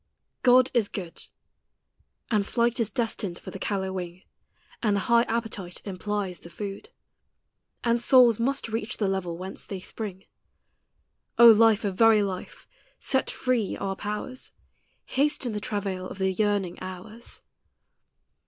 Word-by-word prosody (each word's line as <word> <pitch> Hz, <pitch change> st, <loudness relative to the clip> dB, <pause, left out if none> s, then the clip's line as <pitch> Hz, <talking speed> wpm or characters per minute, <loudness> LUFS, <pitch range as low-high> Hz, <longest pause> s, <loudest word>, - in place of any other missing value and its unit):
FROM 245 Hz, -, +6 dB
"ANIMA -, -, +9 dB
MUNDI." 255 Hz, 0 st, +3 dB
God -, -, 0 dB
is 210 Hz, -, -1 dB
good. 175 Hz, -5 st, -4 dB, 1.1 s
And 210 Hz, -2 st, +2 dB
flight 235 Hz, 0 st, +1 dB
is 225 Hz, -3 st, +1 dB
destined 220 Hz, -7 st, -2 dB
for -, -, -9 dB
the 195 Hz, -, -8 dB
callow 190 Hz, -2 st, -2 dB
wing, 180 Hz, -1 st, -6 dB, 0.6 s
And 210 Hz, -3 st, +2 dB
the 200 Hz, -, +1 dB
high 235 Hz, +2 st, +4 dB
appetite 225 Hz, -6 st, -3 dB
implies 200 Hz, -1 st, -3 dB
the 170 Hz, -, -12 dB
food, 195 Hz, +3 st, -7 dB, 0.9 s
And 235 Hz, 0 st, +2 dB
souls 240 Hz, -3 st, +6 dB
most 270 Hz, +3 st, 0 dB
reach 225 Hz, +1 st, -3 dB
the 205 Hz, -, 0 dB
level 185 Hz, -3 st, -2 dB
whence 185 Hz, +2 st, -7 dB
they 195 Hz, -, -6 dB
spring; 195 Hz, 0 st, -6 dB, 1.1 s
O 235 Hz, -, +8 dB
Life 225 Hz, -1 st, +6 dB
of 190 Hz, -2 st, -3 dB
very 225 Hz, -2 st, +6 dB
life! 185 Hz, -2 st, -6 dB, 0.3 s
set 265 Hz, -, 0 dB
free 245 Hz, -6 st, 0 dB
our 195 Hz, 0 st, -3 dB
powers, 210 Hz, +6 st, -5 dB, 0.5 s
Hasten 275 Hz, -2 st, 0 dB
the 210 Hz, -, -3 dB
travail 195 Hz, -3 st, -3 dB
of -, -, -9 dB
the 190 Hz, -1 st, +1 dB
yearning 200 Hz, -3 st, 0 dB
hours. 185 Hz, +5 st, -7 dB
210 Hz, 150 wpm, -26 LUFS, 190-235 Hz, 1.1 s, ANIMA